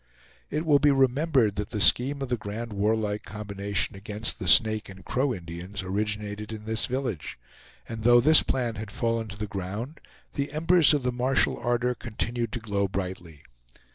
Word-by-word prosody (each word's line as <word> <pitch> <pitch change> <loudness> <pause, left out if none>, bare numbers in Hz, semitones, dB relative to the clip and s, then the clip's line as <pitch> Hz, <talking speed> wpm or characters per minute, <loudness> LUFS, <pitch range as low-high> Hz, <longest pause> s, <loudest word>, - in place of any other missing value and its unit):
It 155 +3 -2
will 145 -3 +5
be 150 - +4
remembered 135 -4 +2
that 105 0 -3
the 105 - -4
scheme 130 +10 +3
of 135 - -5
the 125 - +1
grand 110 +1 -6
warlike 105 0 0
combination 100 -1 -3
against 105 +3 -3
the 95 - -4
Snake 110 +3 +5
and 95 -1 -12
Crow 130 +2 0
Indians 90 0 -6
originated 105 +2 -3
in 110 -1 -8
this 110 0 -1
village; 125 - -4 0.5
and 110 -1 -6
though 120 +1 +6
this 155 +6 +6
plan 120 -4 -2
had 110 -1 -6
fallen 115 +1 -1
to 100 -1 -9
the 105 - -3
ground, 100 - -6 0.3
the 140 +1 -3
embers 165 0 +4
of 145 - -2
the 125 - 0
martial 125 +2 +1
ardor 120 +1 0
continued 120 0 -4
to - - -3
glow 100 -3 -1
brightly. 90 -5 -6
110 Hz, 175 wpm, -26 LUFS, 100-125 Hz, 0.5 s, though